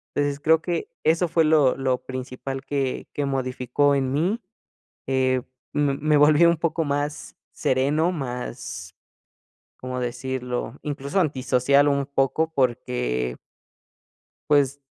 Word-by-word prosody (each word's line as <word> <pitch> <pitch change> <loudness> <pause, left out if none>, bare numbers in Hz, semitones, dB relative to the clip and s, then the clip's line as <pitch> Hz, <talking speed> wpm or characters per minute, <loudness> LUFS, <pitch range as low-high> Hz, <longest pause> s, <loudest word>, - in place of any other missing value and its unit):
Entonces 145 -1 0
creo 160 +2 +4
que 170 -2 -2
eso 165 +3 +3
fue 165 0 +2
lo 155 -4 +4
lo 130 -2 -1
principal 130 +1 -6
que 135 -3 -2
que 145 - -1
modificó 135 +1 0
en 135 -1 0
mí. 180 - 0 0.7
Eh, 130 -1 +2 0.3
me 145 -2 +2
me 150 +1 +2
volvió 155 +3 +6
un 170 - +2
poco 165 0 0
más 145 0 -3 0.2
sereno, 145 +7 +1
más 120 - -6 0.9
¿cómo 130 0 -4
decirlo? 125 0 -3
Incluso 145 +4 -2
antisocial 140 -1 +2
un 140 -1 +1
poco, 140 +4 0
por 125 -4 +2
qué 60 - -2 1.1
pues, 145 -1 +3
140 Hz, 125 wpm, -24 LUFS, 130-150 Hz, 1.1 s, volvió